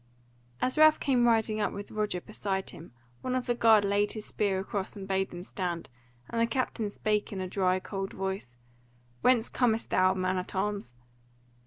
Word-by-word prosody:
As 255 +4 0
Ralph 310 0 +7
came 250 -4 +3
riding 220 -2 +2
up 205 - +1
with 200 +1 -7
Roger 210 -4 -1
beside 195 -2 -3
him, 165 - -12 0.3
one 255 0 -1
of 255 -1 -1
the 240 - +1
guard 220 -3 +5
laid 205 +1 +1
his 215 -1 -6
spear 200 -3 0
across 195 0 -4
and 195 -2 -7
bade 190 0 0
them 175 0 -8
stand, 175 -6 -4 0.4
and 230 - -1
the 230 - +3
captain 230 -3 -1
spake 210 0 -1
in 195 - -4
a 185 - -2
dry 185 0 +1
cold 195 0 -5
voice: 190 -11 -4 0.6
"Whence 245 -3 +4
comest 230 -3 +1
thou, 185 0 +4
man 185 0 0
at 180 - -7
arms?" 200 -10 -2
205 Hz, 185 wpm, -29 LUFS, 190-225 Hz, 0.6 s, Ralph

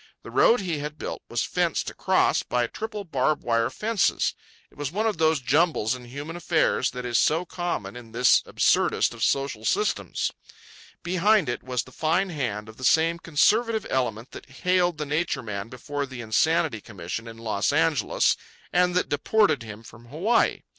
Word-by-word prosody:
The - - -10
road 235 -1 +4
he 170 -6 -2
had 150 +1 -6
built - - -5
was - - 0
fenced - - -1
across - - +2
by 125 -1 0
triple 215 - -6
barb 150 -3 0
wire 115 -1 +1
fences. 220 -2 0 0.4
It - - -23
was 145 -1 -3
one 210 +5 -1
of 215 -7 -1
those 160 -1 +3
jumbles 140 -3 +2
in 125 -1 -8
human 145 +7 -7
affairs 160 -6 +1
that 125 0 -7
is 120 -1 +1
so 165 +4 +2
common 175 - -4
in 120 -2 -11
this 120 +2 +4
absurdest - - +2
of 115 -1 -5
social 140 +5 0
systems. 420 +1 0 0.7
Behind 185 +1 +3
it 120 - -2
was 125 -1 -2
the 130 - -16
fine 170 +7 0
hand 115 -9 -3
of 110 - -13
the 130 - -10
same 165 +5 +3
conservative 220 +8 +2
element 120 -3 -1
that - - -11
haled 180 +4 +1
the 150 - -3
Nature 150 -2 -1
Man 105 -1 -5
before 140 +3 -4
the 130 -2 -8
Insanity 130 +2 +1
Commission 100 +3 -6
in 115 0 -9
Los 110 -3 -1
Angeles - - +2 0.4
and 180 0 +3
that 180 - +1
deported 170 - +2
him 110 -1 -9
from 115 0 -14
Hawaii. 180 - +1
145 Hz, 175 wpm, -25 LUFS, 120-175 Hz, 0.7 s, road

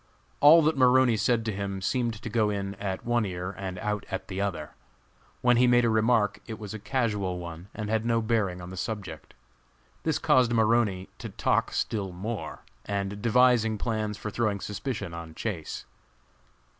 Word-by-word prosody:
All 155 +3 +8
that 155 +1 +2
Maroney 130 -2 +5
said 115 +1 +1
to 110 - 0
him 100 0 -3
seemed 115 +3 0
to - - -4
go 110 -1 +1
in 100 -1 -3
at 95 -2 -4
one 120 -1 +2
ear 90 -2 -4
and 95 -1 -5
out 105 +2 -2
at 95 0 -5
the 95 0 -3
other. 85 -7 -3 0.7
When 125 -1 +4
he 125 +1 +5
made 120 0 +5
a 115 - +3
remark 110 -2 +2
it 110 -2 -6
was 105 0 -7
a 110 - -6
casual 105 -5 -1
one 85 0 -8
and 105 -2 -4
had 110 +1 0
no 115 0 +2
bearing 110 -6 0
on 90 +1 -8
the 95 - -8
subject. 90 -5 -6 0.7
This - - 0
caused 125 -2 +3
Maroney 110 -4 +2
to - - -6
talk - - 0
still 100 -4 -2
more, 105 +5 -5 0.2
devising 110 +3 +2
plans 110 -1 -2
for 105 - -5
throwing 105 -2 0
suspicion 105 -1 -4
on 85 -1 -8
Chase. 90 -8 -4
105 Hz, 175 wpm, -27 LUFS, 95-115 Hz, 0.7 s, All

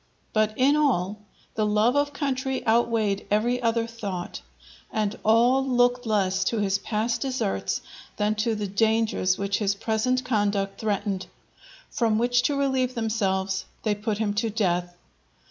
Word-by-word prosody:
But 215 0 +1
in 275 +3 +4
all, 215 -10 +1 0.3
the 215 - 0
love 210 +4 +2
of 285 0 +2
country 265 -2 -2
outweighed 225 -3 +1
every 240 +4 +1
other 230 -1 +1
thought, 200 - -6 0.5
and 215 -1 -1
all 240 +5 +4
looked 245 -1 +2
less 195 -3 +1
to 230 - 0
his 200 -1 +1
past 220 +3 -1
deserts 95 - -1 0.4
than 210 0 +1
to 225 0 0
the 210 -1 -3
dangers 215 -2 +1
which 200 0 -1
his 200 -2 +1
present 230 +5 0
conduct 205 -3 0
threatened; 205 -3 -2 0.6
from 225 -3 +1
which 240 +1 +2
to 285 - -1
relieve 265 -2 0
themselves 195 -4 -1 0.2
they 215 - +1
put 210 0 -2
him 210 -2 0
to 225 +2 0
death. 175 -5 -1
220 Hz, 145 wpm, -25 LUFS, 200-245 Hz, 0.6 s, in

